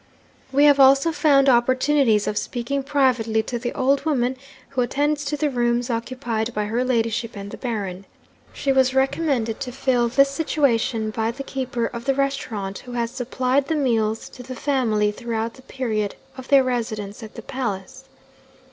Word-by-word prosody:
'We 280 +2 +4
have 285 -1 +6
also 275 +4 +6
found 290 -3 +4
opportunities 255 -2 +3
of 210 - -2
speaking 250 +5 -2
privately 255 -6 +1
to 240 +2 -4
the 240 +1 -3
old 270 +1 +1
woman 260 -5 0 0.3
who 265 -2 -1
attends 290 +4 0
to 295 +1 -2
the 295 -1 0
rooms 240 0 0
occupied 235 -1 -3
by 210 0 0
her 230 +4 0
ladyship 230 -2 -1
and 200 0 -7
the - - -7
Baron. 200 -6 -4 0.5
She 275 - -1
was 265 -1 +3
recommended 265 -4 0
to 250 - -4
fill 250 -2 +1
this 275 +3 +4
situation 260 -6 0
by 220 +1 -1
the 270 +4 -5
keeper 255 -3 -3
of 235 0 -6
the 275 - +2
restaurant 235 -8 -2
who 245 - -10
has 235 -1 -1
supplied 255 +2 0
the 320 - 0
meals 225 -6 0
to 250 - -11
the 255 +1 -8
family 230 -7 +1
throughout 230 0 -3
the 260 - -15
period 225 -6 -3 0.2
of 260 0 -9
their 275 -2 +6
residence 220 -4 -3
at 220 -1 -10
the - - -8
palace. 250 -1 -5
250 Hz, 175 wpm, -22 LUFS, 225-275 Hz, 0.5 s, have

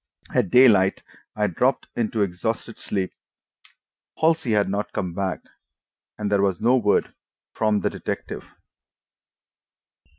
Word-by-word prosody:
At - - +2
daylight 105 -5 +5 0.3
I 105 - +1
dropped 125 +8 +1
into 110 -2 0
exhausted 110 +5 -3
sleep. 95 -2 -3 1.0
Halsey 160 -7 +2
had 105 -1 +3
not 100 +2 -2
come 90 -3 -3
back, 95 0 -2 0.8
and 105 -1 -3
there 100 -1 +3
was 95 -3 +1
no 120 +3 +4
word 110 -5 +2 0.4
from 110 -2 +1
the - - +1
detective. - - -5
105 Hz, 120 wpm, -23 LUFS, 95-115 Hz, 1.0 s, daylight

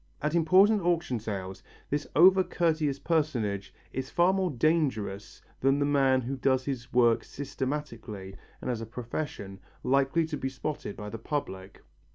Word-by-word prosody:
At 150 +1 -1
important 190 +6 +5
auction 170 -8 0
sales 95 -3 -5 0.3
this 145 +1 -1
over 185 +4 +7
courteous 155 -6 0
personage 120 - -1 0.2
is 130 0 -4
far 175 +2 +3
more 190 -1 +1
dangerous 125 -9 -1 0.2
than 135 +1 +3
the 145 - +1
man 135 -2 +3
who 130 +3 -4
does 130 0 +1
his 125 -3 -4
work 120 -1 +4
systematically 130 -9 -5 0.3
and - - -1
as 115 -2 -3
a 115 - -6
profession, 115 -4 -5 0.2
likely 140 +5 +2
to 155 -2 -4
be 135 - -2
spotted 135 -4 -5
by 105 0 -7
the 115 - -6
public. 95 -8 -5
135 Hz, 155 wpm, -29 LUFS, 115-155 Hz, 0.3 s, over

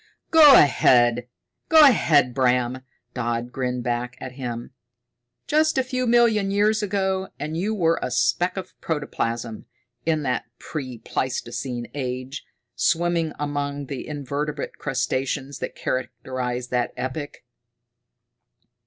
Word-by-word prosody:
"Go 300 -4 +9
ahead, 120 -3 +4 0.4
go 320 -1 +8
ahead, 150 - +5
Bram," 125 -1 +1 0.3
Dodd 120 0 -2
grinned 125 -1 -2
back 120 0 -2
at 130 - -7
him. 120 -2 -6 0.7
"Just 310 0 +2
a 265 - +3
few 255 -1 -2
million 230 -4 +3
years 210 +2 +2
ago, 190 -2 -1
and 155 +2 -4
you 205 +6 -1
were 165 -4 +2
a - - -2
speck 175 +9 +1
of 185 -1 -6
protoplasm 115 -7 -3 0.4
in 155 -2 0
that 130 -2 -1
pre 130 -6 -6
pleistocene 120 +1 -3
age 130 0 -4 0.3
swimming 170 -2 +1
among 145 -1 -3
the 135 -1 -6
invertebrate 145 0 -4
crustaceans 135 +1 -2
that - - -5
characterized 125 0 -3
that 125 -1 0
epoch." 130 +3 -5
140 Hz, 120 wpm, -23 LUFS, 125-175 Hz, 0.7 s, Go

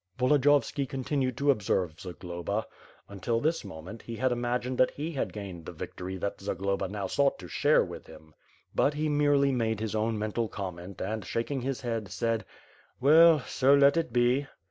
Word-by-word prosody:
Voldiyovski 140 0 +3
continued 130 -2 -1
to 140 0 +4
observe 95 - -1
Zagloba. 90 +3 -4 0.4
Until 100 +4 -2
this 160 +5 0
mo 80 -6 -9
ment, 105 +7 -9
he 115 - -7
had 130 +2 +1
imagined 125 +1 -1
that 130 - +5
he 155 +4 -5
had 140 - -2
gained 95 -5 -7
the - - -5
victory 90 +1 -6
that 100 +2 -4
Zagloba 100 0 -1
now 100 +1 -4
sought 140 -1 +1
to 90 - -10
share - - +3
with - - -9
him. 80 0 -15 0.4
But 145 - +2
he 155 +1 0
merely 145 -1 +3
made 110 -4 0
his 110 -1 -3
own 110 +1 0
mental 110 +2 -1
comment 95 -2 -7
and, 110 +2 -3
shaking 125 +6 -2
his 135 +1 -3
head, 115 -4 -3
said: 110 +3 -1 0.5
"Well, 155 +3 +7
so 135 +2 +3
let 140 +1 +5
it 165 -1 0
be." 125 +3 +2
115 Hz, 180 wpm, -29 LUFS, 100-140 Hz, 0.5 s, Well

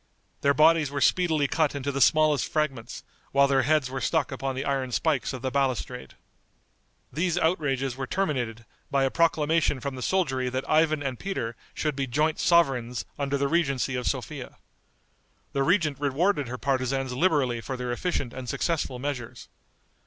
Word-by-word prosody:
Their 140 0 +3
bodies 160 -1 +5
were 140 0 -3
speedily 160 -3 +2
cut 160 -2 +1
into 140 0 -2
the 140 0 -2
smallest 155 +1 +3
fragments, 140 -7 -2 0.3
while 140 0 +5
their 135 -1 +3
heads 150 +1 +2
were 130 0 -5
stuck 155 +1 0
upon 135 0 -3
the 135 +2 -3
iron 135 -2 -1
spikes 145 +3 0
of 130 -1 -7
the 130 - -1
balustrade. 130 - -2 1.0
These 170 +3 0
outrages 135 -7 0
were 135 0 -4
terminated 125 - -2 0.2
by 140 -1 +2
a 135 - +1
proclamation 160 -3 +2
from 140 +1 -4
the 130 - -7
soldiery 130 -8 0
that 130 +2 -3
Ivan 155 -1 +2
and 130 -3 -3
Peter 120 -12 -3 0.2
should 150 -2 -1
be 135 -1 -2
joint 150 +5 0
sovereigns 135 -8 +2
under 140 0 0
the 140 0 +1
regency 140 -5 0
of 125 -1 -2
Sophia. - - -4 1.0
The 140 - 0
regent 155 -2 +2
rewarded 145 - +1
her 125 +2 -5
partisans 130 -1 -1
liberally 130 -5 +1
for 130 +2 -5
their 125 -1 -3
efficient 130 -2 -2
and 130 -2 -7
successful 155 -6 -1
measures. 130 -3 -5
140 Hz, 165 wpm, -26 LUFS, 130-155 Hz, 1.0 s, bodies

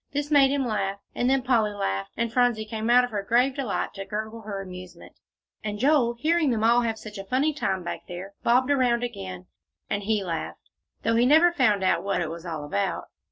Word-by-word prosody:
This 290 +1 -2
made 280 -2 +6
him 275 -1 0
laugh, 200 -4 -1 0.2
and 245 - 0
then 270 -1 +2
Polly 230 -5 +2
laughed, 100 - -3
and 235 0 -1
Phronsie 245 -3 +2
came 220 +1 -3
out 250 +1 +6
of 245 - -3
her 205 -2 -2
grave 245 +6 +2
delight, 260 -7 -3
to 195 - -6
gurgle 220 +2 -5
her 205 -2 -5
amusement; 180 -2 -10 0.5
and 210 -1 -3
Joel, 255 -1 +3
hearing 315 +4 +1
them 225 -3 0
all 235 +2 +5
have 225 -2 -1
such 215 -2 -9
a - - -5
funny 265 +9 +1
time 195 -10 -2
back - - -6
there, 180 +3 -8
bobbed 255 +3 +3
around 245 -3 +2
again, 190 -6 -6 0.5
and 200 - 0
he 210 0 0
laughed, 170 -3 -5 0.3
though 230 - +2
he 240 +1 +4
never 320 +5 +6
found 215 - +2
out 185 - +2
what 195 -2 0
it 165 -3 -2
was 170 +1 -8
all 155 -3 -4
about. 100 -9 -2
220 Hz, 215 wpm, -25 LUFS, 195-250 Hz, 0.5 s, made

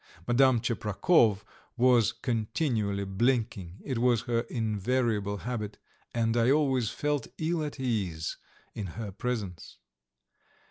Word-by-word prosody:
Madame 125 0 +5
Tcheprakov 110 - +2 0.3
was 120 -4 +5
continually 110 -3 -1
blinking 100 -3 -1
it 130 -4 -2
was 120 -2 +3
her 120 -1 0
invariable 110 -2 0
habit, 110 -2 -4 0.3
and 115 -1 0
I 120 +1 +3
always 135 -5 +2
felt 145 +2 -1
ill 160 0 0
at 145 -2 -5
ease 100 -11 -2 0.4
in 100 - -4
her 110 -3 -4
presence. 105 -5 -4
115 Hz, 110 wpm, -29 LUFS, 105-130 Hz, 0.4 s, Madame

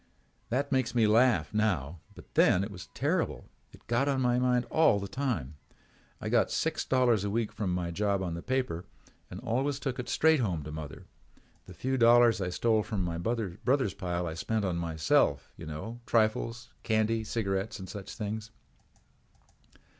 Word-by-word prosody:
That 140 +4 -1
makes 130 -3 +1
me 115 -2 +4
laugh 115 +3 +3
now 90 -8 0 0.2
but - - -15
then 90 - +4
it 100 - -5
was 90 -3 -9
terrible. - - -1 0.3
It - - -16
was 120 +4 +1
on 135 -2 +1
my 125 -1 +2
mind 125 -1 +2
all 155 -10 +4
the 100 - -5
time. 110 - -3 0.6
I - - -5
got - - +3
six - - -1
dollars 120 -6 +2
a 100 - -1
week 115 +1 -1
from 100 -4 -2
my 90 -1 -2
job 100 +1 0
on 90 -2 -3
the 85 - -5
paper 125 -9 -1 0.5
and 90 - -7
always 130 +4 0
took 135 -2 -4
it 125 0 -4
straight 160 -1 +4
home 90 - -1
to 75 - -7
mother. 75 -1 -8 0.6
The 90 - -11
few 130 +5 -1
dollars 120 -2 +6
I 90 - -1
stole 110 +4 +2
from 105 -3 -3
my 85 -1 -3
brother's 115 +3 0
pile 90 -2 -3
I 80 - -3
spent 105 +5 -1
on 90 -3 -1
myself, 80 -2 +1
you - - -9
know, 95 +10 -6
for - - -21
trifles, 115 +1 +1
candy 110 0 +1
and 110 -1 -5
cigarettes 100 -1 -2
and 95 - -8
such 100 -1 -8
things. 110 0 -4
110 Hz, 185 wpm, -30 LUFS, 90-120 Hz, 0.6 s, dollars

